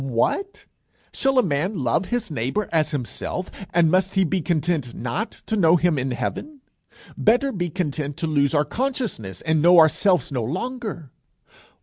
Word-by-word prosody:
What! 135 - -1 0.5
shall 270 0 +1
a 255 - +6
man 175 +5 -1
love 125 +9 +1
his 240 -6 -3
neighbour 135 - -2
as 155 -2 +2
himself, 150 +6 -4 0.2
and 170 -2 +3
must 185 +1 +1
he 190 - +4
be 185 +1 0
content 155 -6 -1
not 155 - -3 0.2
to 220 - -1
know 170 -4 +5
him 170 -4 +2
in 130 +1 -2
heaven? 280 - -4 0.5
Better 245 +5 +2
be 175 -5 -2
content 150 -5 -3
to - - -2
lose 145 -1 +1
our 145 0 +3
consciousness, 225 - -3
and 155 -1 +1
know 175 +2 +6
ourselves 170 +2 +4
no 130 -3 -1
longer. 185 - -4
170 Hz, 160 wpm, -23 LUFS, 145-205 Hz, 0.5 s, a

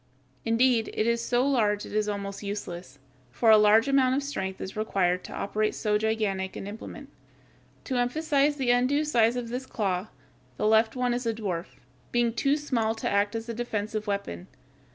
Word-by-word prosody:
Indeed, 230 0 +3
it 215 - +1
is 235 0 +1
so 245 +3 +1
large 210 -7 +1
as - - -10
to 210 0 0
be - - 0
almost 200 -1 -5
useless, 180 -8 -6 0.3
for 220 - +3
a 215 - +9
large 215 +4 +5
amount 265 -2 +3
of 280 - 0
strength 190 -9 -4
is 190 - -6
required 185 -4 0
to - - -9
operate 215 +2 -1
so 210 -1 +1
gigantic 210 -4 -1
an - - -6
implement. 220 +7 -8 0.7
To 260 - -2
emphasize 285 +3 +1
the 260 -4 +1
undue 260 +5 +2
size 235 -5 +3
of 245 -2 -4
this 255 +2 -4
claw, 195 -2 -1 0.5
the - - -1
left 220 +2 +4
one 250 -1 0
is 245 0 -2
a 225 - 0
dwarf, 185 -6 -3 0.4
being 240 -1 +2
too 275 +4 +1
small 235 -7 -1
to - - -3
act 205 +1 +1
as 225 +1 -4
a 230 - -3
defensive 215 -2 -3
weapon. 150 - -3
225 Hz, 190 wpm, -27 LUFS, 205-245 Hz, 0.7 s, a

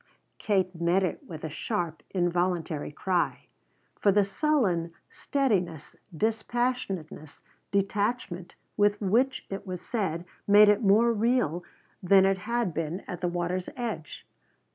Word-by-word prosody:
Kate 190 -3 +1
met 175 +3 +3
it 185 - -2
with 160 -3 -8
a 160 - -3
sharp, 170 -4 -3
involuntary 175 -4 -1
cry. 180 +3 -1 0.5
For 200 - +4
the 205 0 +4
sullen 195 - +1 0.2
steadiness, 185 - -1 0.2
dispassionateness, 220 -8 -2 0.3
detachment 200 -2 -1 0.2
with 205 0 +3
which 245 +7 +1
it 195 +1 -5
was 180 -1 -5
said 180 -7 -2 0.2
made 205 +1 +8
it 210 +2 +4
more 225 +3 +4
real 220 - +1 0.4
than 190 +1 +5
it 195 0 +2
had 235 -2 -1
been 165 +4 -3
at 180 -3 -7
the 180 - +1
water's 175 +1 -2
edge. 225 -11 -5
190 Hz, 125 wpm, -28 LUFS, 175-215 Hz, 0.5 s, made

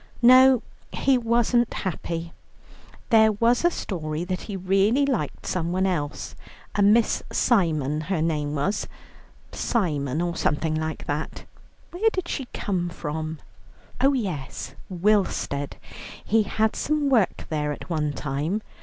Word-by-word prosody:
No, 255 0 +7 0.3
he 270 - +2
wasn't 240 0 +2
happy. 170 -2 -4 0.8
There 220 -1 +6
was 235 +6 +2
a 345 - +5
story 160 - -4
that 180 0 -3
he 200 -3 -5
really 195 +9 +2
liked 225 - -2
somebody 185 +2 0
else: 150 -5 -3 0.4
a 205 - 0
Miss 215 +3 +4
Simon 155 - +1
her 175 +2 -2
name 150 -2 -1
was 185 +9 -1 0.6
Simon, 150 - -1
or 175 0 -1
something 155 +1 0
like 155 0 -3
that. 150 +2 -4 0.5
Where 415 +6 +2
did 370 -4 -3
she 270 -6 -3
come 180 -3 -2
from? 160 -1 -4 0.7
Oh 275 +1 +5
yes, 155 - -4 0.2
Willstead; 185 -7 0 0.5
he 225 +1 +3
had 220 0 +1
some 300 -1 0
work 235 -8 +2
there 150 -1 0
at 145 - -7
one 155 -4 -1
time. 150 +9 -2
185 Hz, 130 wpm, -25 LUFS, 155-230 Hz, 0.8 s, No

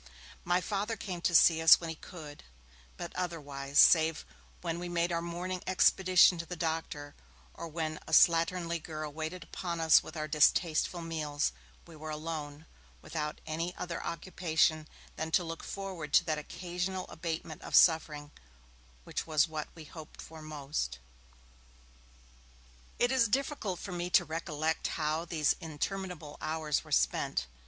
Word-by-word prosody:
My 180 +1 +2
Father 210 +3 -2
came 180 -4 -5
to 170 0 +1
see 160 0 +6
us 160 - +9
when 165 -1 -5
he - - -6
could, 155 -3 -11 0.5
but 170 - -7
otherwise, 145 -6 -4
save 160 -1 +6 0.4
when 170 -1 -3
we 175 0 -5
made 170 0 0
our 170 0 0
morning 175 +2 -4
expedition 185 -1 +5
to 165 - -4
the 180 - -5
doctor, 160 -3 -3 0.4
or - - -7
when 155 -1 -3
a - - -8
slatternly 170 0 +4
girl 155 -1 -6
waited 160 +3 -5
upon 170 0 -5
us 160 -1 +6
with 160 - -10
our 155 0 -2
distasteful 160 +3 +2
meals, 150 - -1 0.3
we 165 - -13
were 155 +1 -8
alone, 155 -1 -5 0.4
without 150 -2 -4
any 165 +3 -3
other 175 -1 -5
occupation 165 -2 0 0.3
than 160 +1 -3
to 175 +2 +3
look 165 -1 -6
forward 185 -7 -6
to - - +7
that 155 -2 -1
occasional 180 +4 -4
abatement 160 -1 -5
of - - -3
suffering 150 -3 +4 0.7
which - - -4
was 155 0 +3
what 155 -1 -4
we 165 - -10
hoped 155 0 -12
for 160 -1 -10
most. 145 - -4 2.0
It 245 - +2
is 255 -3 +4
difficult 260 - -1
for 195 - -7
me 175 0 -3
to 175 0 +4
recollect 160 0 -2
how 155 +1 -1
these 160 -3 +1
interminable 165 -1 -5
hours 155 -1 -1
were - - -15
spent. - - +1
165 Hz, 150 wpm, -31 LUFS, 155-175 Hz, 2.0 s, us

